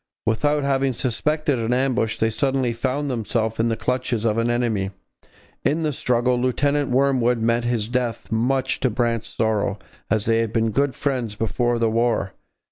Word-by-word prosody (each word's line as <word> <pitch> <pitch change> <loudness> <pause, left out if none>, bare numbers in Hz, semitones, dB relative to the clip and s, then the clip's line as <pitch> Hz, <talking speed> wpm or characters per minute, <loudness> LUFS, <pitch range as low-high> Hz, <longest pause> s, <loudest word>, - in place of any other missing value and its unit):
Without 145 +6 +1
having 135 -1 +1
suspected 145 +3 0
an 115 +1 0
ambush, 125 -3 +1
they 110 0 +1
suddenly 130 0 0
found 130 +5 -2
themselves 115 -3 -1
in 115 - +2
the 115 - -1
clutches 125 -3 -1
of 110 0 +2
an 115 +1 +1
enemy. 115 -5 0 0.7
In 155 +4 +1
the 150 -2 0
struggle 125 0 +1
Lieutenant 140 +3 +1
Wormwood 125 -2 +2
met 115 +1 +1
his 120 -3 0
death, 120 -1 -2
much 130 +4 +1
to 130 - +1
Brant's 115 0 -1
sorrow, 110 -3 0 0.3
as 110 -2 +1
they 115 0 +3
had 115 -2 -1
been 115 0 +1
good 140 +4 +1
friends 125 -7 -2
before 120 +3 0
the 115 -1 +1
war. 115 -4 0
120 Hz, 170 wpm, -22 LUFS, 115-130 Hz, 0.7 s, they